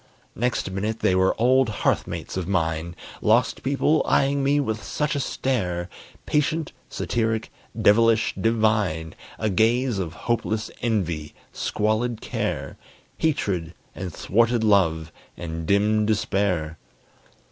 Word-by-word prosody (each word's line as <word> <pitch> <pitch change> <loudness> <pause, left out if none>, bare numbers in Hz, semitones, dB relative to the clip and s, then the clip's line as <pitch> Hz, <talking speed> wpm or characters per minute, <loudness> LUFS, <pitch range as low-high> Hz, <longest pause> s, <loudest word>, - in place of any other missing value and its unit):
Next 120 -5 -1
minute 105 +4 -3
they 95 - +3
were 95 +2 +2
old 130 +1 +4
hearth 105 - 0
mates - - -6
of 95 -2 -3
mine! 85 -2 -1 0.3
Lost - - +2
people, 140 +3 +2
eyeing 140 0 +2
me 140 +1 +3
with 110 -5 -2
such 150 +9 -2
a - - 0
stare! 95 -10 -1 0.4
Patient, 150 +1 0 0.2
satiric, 110 -2 -1 0.3
devilish, 115 +1 +4
divine; 105 -8 +1 0.2
A 110 -1 -1
gaze 115 +3 +2
of 85 -4 -3
hopeless 115 -2 -1
envy, 85 -10 -1 0.2
squalid 110 +2 -1
care, - - -3 0.4
Hatred, 95 - -1 0.2
and 95 -1 -5
thwarted 115 +6 +1
love, 85 -7 +2 0.3
and 80 -1 -5
dim 105 +2 +3
despair. 95 -7 0
110 Hz, 120 wpm, -24 LUFS, 90-120 Hz, 0.4 s, old